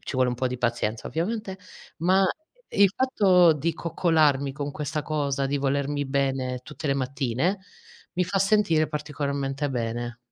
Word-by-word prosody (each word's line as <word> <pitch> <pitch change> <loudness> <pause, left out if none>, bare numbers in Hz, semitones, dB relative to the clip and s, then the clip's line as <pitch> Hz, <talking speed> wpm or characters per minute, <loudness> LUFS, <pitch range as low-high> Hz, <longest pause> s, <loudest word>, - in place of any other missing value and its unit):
ci - - -7
vuole 130 -1 +2
un - - -2
po' 125 +1 -1
di 125 -1 -5
pazienza 115 -2 -1
ovviamente, 190 +3 -3 0.4
ma 185 +3 +3 0.4
il 200 -1 +4
fatto 185 -10 +5
di 155 +3 -1
coccolarmi 155 -4 +1
con 145 0 -4
questa 150 +1 -3
cosa, 140 -3 -1
di 140 +1 -1
volermi 140 +1 0
bene 135 -2 -1
tutte 150 0 -6
le 140 - +2
mattine, 135 - -1 0.5
mi 180 0 +1
fa 195 +2 -1
sentire 190 -6 +3
particolarmente 140 -2 -3
bene. 120 0 -3
145 Hz, 150 wpm, -26 LUFS, 135-170 Hz, 0.5 s, fatto